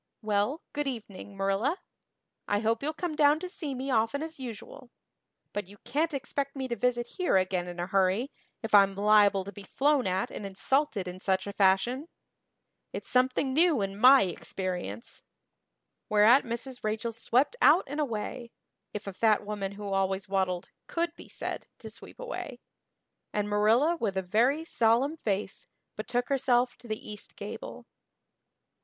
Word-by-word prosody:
Well, 215 +8 0
good 295 -1 -1
evening, 205 -5 -7
Marilla. 195 - +1 0.7
I 205 0 +1
hope 225 +1 +1
you'll 295 +2 -1
come 315 0 -4
down 295 +1 +4
to 365 - -5
see 310 -7 -5
me 265 +2 -3
often 230 +5 +1
as 320 -2 -7
usual. 245 +1 -8 0.6
But 205 -3 -3
you 205 +2 -14
can't 310 +2 0
expect 275 +1 -3
me 265 -1 -3
to 235 - -1
visit 240 0 0
here 360 - +3
again 185 -1 0
in 175 0 -7
a 175 - -1
hurry, 195 +7 +1 0.3
if 225 - -5
I'm 195 -1 +6
liable 205 -1 +4
to 200 - -8
be 205 - -10
flown 275 +5 +1
at 185 +1 -1
and - - -6
insulted 200 +1 0
in 180 +1 -7
such 190 -1 0
a 200 - -5
fashion. 205 - +2 0.8
It's - - -6
something 255 +1 +2
new 325 -2 +4
in 195 0 -3
my 255 +5 +7
experience." 185 +3 -4 0.9
Whereat 215 +6 +6
Mrs. 240 +2 -5
Rachel 220 +2 -1
swept 245 - +1
out 320 +5 +6
and 290 +3 -5
away 240 -2 -3 0.5
if 210 - -5
a 195 - -5
fat 215 +1 +2
woman 200 -2 -4
who 200 -1 -5
always 195 +1 0
waddled 190 -2 -1 0.2
could 340 0 -2
be - - -13
said - - -5
to - - -9
sweep - - -12
away - - -6 0.7
and 205 0 -1
Marilla 225 +11 +3
with 205 -9 -2
a 190 - 0
very 245 - +2
solemn 240 +2 +2
face 205 -8 -3 0.3
betook 245 +3 -2
herself 250 -2 +2
to 240 - -14
the 215 -1 -5
east 210 -1 -7
gable. - - -8
225 Hz, 165 wpm, -29 LUFS, 200-275 Hz, 0.9 s, my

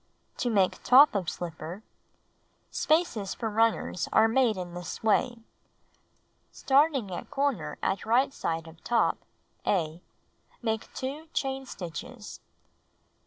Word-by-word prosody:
To 245 - 0
Make 195 -5 +2
Top 275 +3 +7
of 195 -4 -1
Slipper 170 +3 -6 0.9
Spaces 305 - +1
for 225 -2 -3
runners 225 -4 +1
are 220 - +5
made 230 -2 +2
in 175 -1 -6
this 175 +4 -7
way: 220 +2 +2 1.1
Starting* 275 -6 +2
at - - -6
corner 240 - -1
at 190 -1 0
right 255 +5 +2
side 165 - -3
of 160 0 -15
top 235 -1 +2 0.4
(A), 165 -3 0 0.6
make 220 -1 -2
2 285 +5 -5
chain 270 -1 -2
stitches. 210 +6 -8
220 Hz, 120 wpm, -28 LUFS, 180-265 Hz, 1.1 s, Top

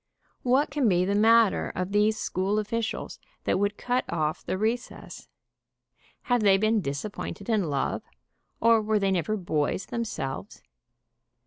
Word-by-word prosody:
What 265 +4 +2
can 275 -5 +2
be 180 -1 +3
the 200 - 0
matter 225 +1 +4
of 185 +1 -3
these 210 +1 +3
school 190 +3 -1
officials 225 +2 -3 0.2
that - - +1
would 205 0 0
cut 250 +1 0
off 155 -2 -1
the - - -2
recess? 225 +4 -4 1.0
Have 245 -3 +1
they 195 -2 +5
been 215 +1 +2
disap 140 +7 -4
pointed 200 - -6
in 215 -5 +2
love, 140 -2 -1 0.6
or 230 -1 +5
were 215 0 +1
they 195 -1 +1
never 190 +4 0
boys 170 -1 -1
themselves? 210 - -5
210 Hz, 145 wpm, -27 LUFS, 185-230 Hz, 1.0 s, they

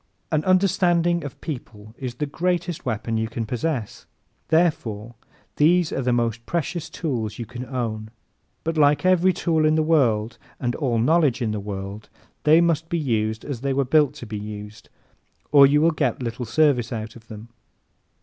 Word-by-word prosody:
An 155 -1 +1
understanding 175 -2 +2
of 145 - -8
people 110 -7 -8
is 125 -2 -6
the 150 - -2
greatest 175 +1 -2
weapon 115 0 -2
you 110 0 -1
can 115 0 -4
possess. 125 0 -3 0.4
Therefore 120 -10 0 0.4
these 170 +2 +3
are - - -1
the 125 -1 0
most 115 -1 0
precious 170 0 -2
tools 115 -10 -3
you 120 - -5
can 125 +2 -7
own. 110 -4 -3 0.5
But 165 0 -2
like 145 +4 +4
every 185 0 +4
tool 165 -3 0
in 155 0 +3
the 155 - +2
world 120 -8 +1 0.2
and 120 -1 -1
all 125 -5 -1
knowledge 145 +2 +3
in 115 -3 -1
the 105 - -3
world, 100 +1 -7 0.4
they 155 +2 +6
must 165 -1 +1
be 170 - 0
used 110 -7 -1
as 135 -5 -5
they 140 0 0
were 140 0 +1
built 145 +1 +3
to 145 - -8
be 105 -2 -5
used 105 0 -9 0.6
or 140 -2 +8
you 145 +2 +3
will 165 +1 +4
get 155 - -1
little 120 +1 -4
service 130 -2 +2
out 110 -1 -5
of 110 -2 -15
them. 110 +1 -10
130 Hz, 180 wpm, -23 LUFS, 110-160 Hz, 0.6 s, or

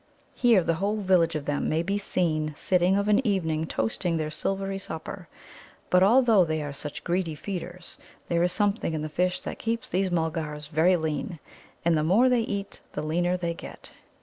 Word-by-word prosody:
Here 230 -7 +4
the 165 - +1
whole 205 +2 +1
village 185 -5 +2
of 150 -2 -3
them 145 -1 -1
may 160 +2 +1
be 200 +3 -1
seen 155 -6 -1
sitting 180 +4 +2
of 200 +1 0
an 210 +5 +4
evening 160 -8 0
toasting 165 +10 -1
their 155 -1 -2
silvery 195 +3 -2
supper. 180 +1 -7 0.6
But, 180 - +5
although 225 -1 +6
they 155 -2 -1
are 145 -1 -5
such 145 +1 -6
greedy 175 -2 -1
feeders, 180 +1 -6 0.3
there 170 -1 +1
is 180 +1 +2
something 205 -4 0
in 155 - -3
the 155 - -4
fish 180 +3 0
that - - -6
keeps 230 0 -2
these 190 +1 0
Mulgars 160 -3 -2
very 165 +4 +4
lean. 160 +4 -3 0.5
And 170 -1 +4
the 155 - +1
more 210 +11 +4
they 250 -2 +3
eat 200 -3 -4
the 150 - -3
leaner 175 +3 +1
they 170 -1 -2
get. - - -11
175 Hz, 190 wpm, -27 LUFS, 160-195 Hz, 0.6 s, although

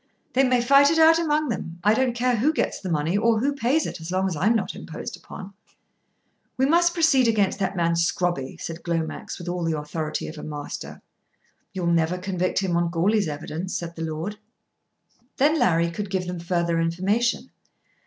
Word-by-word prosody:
"They 265 - +4
may 250 -2 +3
fight 275 +3 +6
it 325 - +1
out 325 +1 +6
among 305 -3 +1
them. 175 -6 -4
I 210 - +5
don't 245 +1 +1
care 245 0 +1
who 270 +8 +3
gets - - -1
the 185 - -6
money 160 +2 0
or 225 +2 +3
who 280 +5 +1
pays 280 +4 +1
it - - -6
as 160 - -7
long 190 +1 +1
as 185 - -2
I'm 210 +10 +2
not 225 - -1
imposed - - -7
upon." 195 +1 -10 1.0
"We 265 - +3
must 345 +4 +3
proceed 310 -7 +4
against 205 -3 +1
that 195 0 -1
man 170 -1 +1
Scrobby," 170 -4 -1
said 165 0 -6
Glomax 165 -2 -3
with 175 - -9
all 175 0 -2
the 165 -1 0
authority 155 +1 -4
of 155 0 -8
a - - -8
Master. 150 -1 -7 0.7
"You'll 185 -2 -4
never 170 +1 +2
convict 185 -1 -2
him 180 -3 0
on 170 0 +1
Goarly's 195 +4 +1
evidence," 155 +4 -5
said 170 -1 -6
the 165 - -7
Lord. 165 +6 -4 1.0
Then 300 +4 +3
Larry 170 -7 +2
could 205 +3 -5
give 190 -1 -1
them 180 -1 -5
further 170 -1 0
information. 190 +8 0
185 Hz, 195 wpm, -24 LUFS, 170-240 Hz, 1.0 s, fight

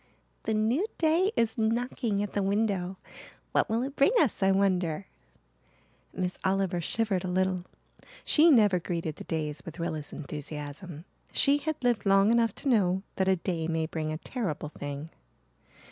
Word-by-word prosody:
"The 220 - +1
new 235 - +1
day 335 +5 +3
is 230 0 +1
knocking 225 -2 0
at 205 - -5
the 205 - 0
window. 195 -2 0 0.5
What - - +2
will 225 +2 +1
it 275 +2 -5
bring 280 - +4
us, 275 -10 +1
I 195 0 +4
wonder." 185 -3 +1 1.1
Miss 180 -1 -3
Oliver 190 -2 +1
shivered 200 +1 0
a - - -3
little. 185 0 0 0.6
She 325 +2 +6
never 210 - +5
greeted 165 -3 -3
the - - -8
days 150 -2 -3
with 165 - -9
Rilla's 160 -3 -4
enthusiasm. 150 +2 -7 0.3
She 285 +1 +4
had 310 +2 -2
lived 235 -5 +1
long 195 +2 +5
enough 230 -2 +2
to - - -6
know 190 -6 +2
that 190 - +1
a 190 - +4
day 170 -2 -2
may 160 -1 0
bring 155 -1 -3
a 155 - -3
terrible 170 - -4
thing. 145 +1 -6
190 Hz, 160 wpm, -29 LUFS, 165-225 Hz, 1.1 s, She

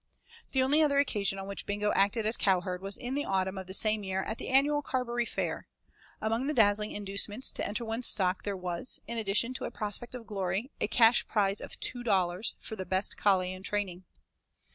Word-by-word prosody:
The 265 -1 +2
only 290 +4 +3
other 290 -2 +3
occasion 205 -8 +1
on 195 - -6
which 200 - -7
Bingo 205 +1 0
acted 205 +3 +2
as 220 +2 +2
cowherd 180 -2 0
was 195 +1 -3
in 250 0 -5
the 290 +1 -1
autumn 190 -2 -1
of 190 -1 -7
the 190 - -8
same 215 -1 +2
year 190 0 -2
at 220 - -5
the - - -6
annual 285 +3 +3
Carberry 240 -3 -2
Fair. - - -3 0.5
Among 225 +5 -1
the 300 - -1
dazzling 210 -1 +4
inducements 205 +4 -1
to - - -2
enter 215 +3 -4
one's 225 +2 +2
stock 185 -2 +4
there 200 -2 -3
was, 180 +4 -2
in 235 0 -4
addition 220 +4 +1
to - - -5
a - - -3
prospect 215 +4 +1
of 240 -2 -8
glory, 195 +5 -2
a - - +1
cash 230 0 +4
prize 200 -2 0
of - - -8
'two 245 - -3
dollars' 190 -3 0
for 220 - -8
the 190 - -5
'best 190 +2 -1
collie 185 -2 +2
in 185 - -9
training'. 190 -2 -2
210 Hz, 210 wpm, -30 LUFS, 190-240 Hz, 0.5 s, dazzling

